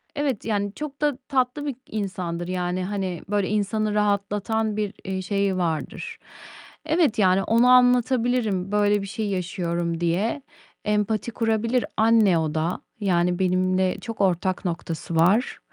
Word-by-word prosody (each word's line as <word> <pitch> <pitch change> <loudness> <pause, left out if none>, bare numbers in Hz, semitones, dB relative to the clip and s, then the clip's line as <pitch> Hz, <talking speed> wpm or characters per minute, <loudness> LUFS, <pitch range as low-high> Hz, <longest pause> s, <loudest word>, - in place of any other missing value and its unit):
Evet, 280 -7 -1
yani, 205 -2 -1
çok 295 +1 -7
da 295 -3 +1
tatlı 265 +2 0
bir 280 - -3
insandır. 185 -5 -4
Yani, 180 0 -2
hani, 190 -3 -3
böyle, 205 -2 0
insanı 215 +1 0
rahatlatan 210 +1 0
bir, 210 -1 -2
eee, 190 -1 -2
şeyi 200 0 0
vardır. 165 -3 -3 0.7
Evet, 315 -8 +2
yani, 190 -1 +4
ona 235 +3 +4
anlatabilirim, 245 -5 +3
böyle 205 0 +2
bir 195 - -6
şey 215 +1 -3
yaşıyorum 170 -2 -2
diye. 185 - 0 0.4
Empati 210 +2 0
kurabilir. 230 +2 0
Anne 220 -5 +4
o 155 -1 -1
da. 160 +3 -1 0.2
Yani 180 -2 +1
benimle 185 0 +1
çok 225 -3 -5
ortak 185 0 0
noktası 165 -1 -4
var. 185 +9 +3
205 Hz, 135 wpm, -24 LUFS, 185-225 Hz, 0.7 s, yani